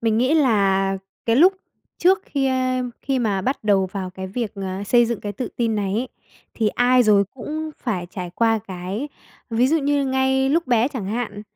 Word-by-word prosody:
mình 225 -1 +1
nghĩ 255 +6 +2
là 195 -8 +2 0.3
cái 230 0 +3
lúc 360 +7 +6 0.5
trước 375 +2 +4
khi, 275 -2 -1
ơ, 255 -1 0 0.2
khi 270 -1 0
mà 205 -5 0
bắt 260 -2 -2
đầu 195 -2 +3
vào 185 -1 -5
cái 190 +1 -7
việc, 215 +2 -4
à, 190 -1 -4
xây 240 +2 +4
dựng 235 -2 -3
cái 205 - -4
tự 245 +5 -4
tin 230 -2 0
này 195 -2 -1
ấy, 245 +4 -1 0.5
thì 220 -2 +1
ai 245 +3 +3
rồi 205 -3 +4
cũng 310 +5 -5
phải 185 -8 -2
trải 180 -1 -6
qua 225 -1 +2
cái 190 +9 -4 0.4
ví 235 +3 +2
dụ 320 +3 +3
như 285 -1 +1
ngay 265 0 +1
lúc 330 +3 +1
bé 240 0 +3
chẳng 245 -9 -5
hạn, 215 -1 -3
230 Hz, 205 wpm, -22 LUFS, 200-265 Hz, 0.5 s, lúc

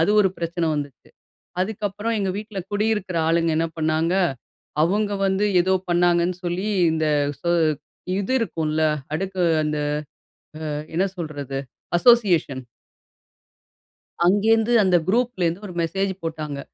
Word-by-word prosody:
அது 165 +5 +3
ஒரு 190 - +4
பிரச்சன 170 -1 -1
வந்துச்சு. 145 -3 -6 0.5
அதுக்கப்றம் 210 +2 -2
எங்க 195 -1 0
வீட்ல 210 -1 -7
குடியிருக்குற 205 -4 0
ஆளுங்க 165 0 +2
என்ன 165 0 +1
பண்ணாங்க, 160 +2 +1 0.7
அவுங்க 205 +4 +1
வந்து 195 +2 +1 0.2
ஏதோ 190 +1 +1 0.2
பண்ணாங்கன்னு 175 0 +2
சொல்லி, 180 +4 -2 0.3
இந்த 160 -1 0 0.4
ஸொ 170 - -1 0.7
இது 200 +6 -1
இருக்கும்ல, 160 -7 -1 0.3
அடுக்கு 190 +1 -3 0.2
அ-அந்த 150 -1 -1 1.0
அ - - -6
என்ன 190 +3 +2
சொல்றது? 145 -5 -4 0.4
அசோசியேஷன் 175 - +3 1.6
அங்கேந்து, 225 +4 +3
அந்த 185 -2 +3
குரூப்லேருந்து 205 -5 0
ஒரு 180 - -8
மெசேஜ் 190 +4 -1
போட்டாங்க. 155 -3 -4
180 Hz, 115 wpm, -23 LUFS, 160-205 Hz, 1.6 s, ஒரு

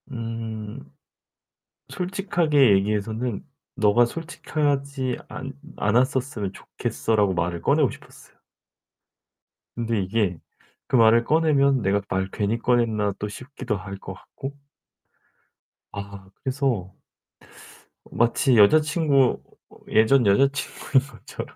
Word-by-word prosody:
음 115 -3 -6 1.1
솔직하게 175 - +2
얘기해서는 105 +3 -2 0.3
"너가 105 +3 +4
솔직하지 140 -4 -2
않 135 +1 -7 0.2
않았었으면 125 -2 0
좋겠어."라고 105 -2 -1
말을 85 0 -2
꺼내고 - - +3
싶었어요. - - -15 1.4
근데 115 -2 -1
이게 95 -2 0 0.5
그 - - 0
말을 115 0 +5
꺼내면 140 -3 +3
'내가 100 0 +1
말을 95 0 -1
괜히 105 +2 -1
꺼냈나?' 115 -4 +1
또 105 - -3
싶기도 125 0 -5
할 100 +1 -8
것 - - -8
같고 135 +1 -9 1.4
아 100 -1 -8
그래서 130 -9 -1 1.2
마치 120 +1 +2
여자친구 150 - +4 0.5
예전 115 +3 +4
여자친구인 135 +4 +2
것처럼 125 -4 -10
115 Hz, 230 characters per minute, -24 LUFS, 105-135 Hz, 1.4 s, 말을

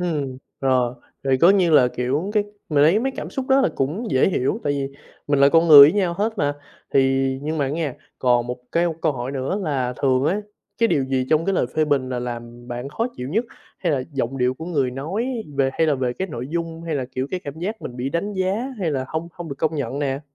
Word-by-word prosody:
Ừm, 150 -7 -2 0.2
rồi, 125 -2 +2 0.3
vậy 135 -1 +3
có 175 - +7
như 190 -4 +3
là, 140 -5 +6
kiểu, 135 +10 -2
cái 210 -1 +2 0.2
mà 150 -3 +2
lấy 160 +8 +5
mấy 265 +4 -1
cảm - - -5
xúc 265 -1 -4
đó 265 +1 +5
là 270 - +3
cũng 175 - -2
dễ 130 +7 +4
hiểu 175 - 0
tại 145 - +1
vì 140 -1 -2 0.4
mình 145 -1 +2
là 140 - +7
con 165 +3 +4
người 150 -2 +11
với 145 +3 +10
nhau 185 -4 +1
hết 220 +1 -1
mà, 145 -2 +1 0.4
thì 135 0 +3 0.2
nhưng 155 +2 -2
mà 145 - +2
á 135 - -2
nghe, 150 -3 -2 0.2
còn 120 -2 +2
một 125 0 -3 0.2
cái 170 +1 +2 0.2
câu 155 -3 +2
hỏi 125 +1 -4
nữa 135 +8 -2
là 135 -6 -1
thường 130 -1 +3
ấy, 190 +7 +1 0.4
cái 230 - +3
điều 140 - +2
gì 130 -1 -1
trong 155 +1 +3
cái 195 - +1
lời 125 - +1
phê 155 - +3
bình 140 -3 0
là 125 -1 -2
làm 120 0 -7
bạn 120 +2 -5
khó 225 - -1
chịu 125 - -5
nhất? 215 - 0 0.3
Hay 170 -4 0
là 135 -3 0
giọng 135 0 -2
điệu 125 0 +1
của 160 - -8
người 140 -7 0
nói 160 - -3 0.3
về 135 -1 +2
hay 160 - +1
là 150 - +3
về 130 -2 -1
cái 190 +8 -4
nội 125 -5 -5
dung 165 0 -3
hay 165 -2 -3
là, 135 -3 -1
kiểu, 130 +1 -1
cái 185 - -2
cảm 145 +2 -7
giác 210 +6 -4
mình 125 - -7
bị 125 +2 -2
đánh 200 +7 -2
giá 190 -1 0 0.2
hay 175 -5 0
là 130 -2 -1
hông 160 +2 -4
hông 175 -1 -8
được 140 - -4
công 160 0 0
nhận 140 -2 -3
nè? 140 -1 -1
145 Hz, 260 wpm, -22 LUFS, 130-170 Hz, 0.4 s, người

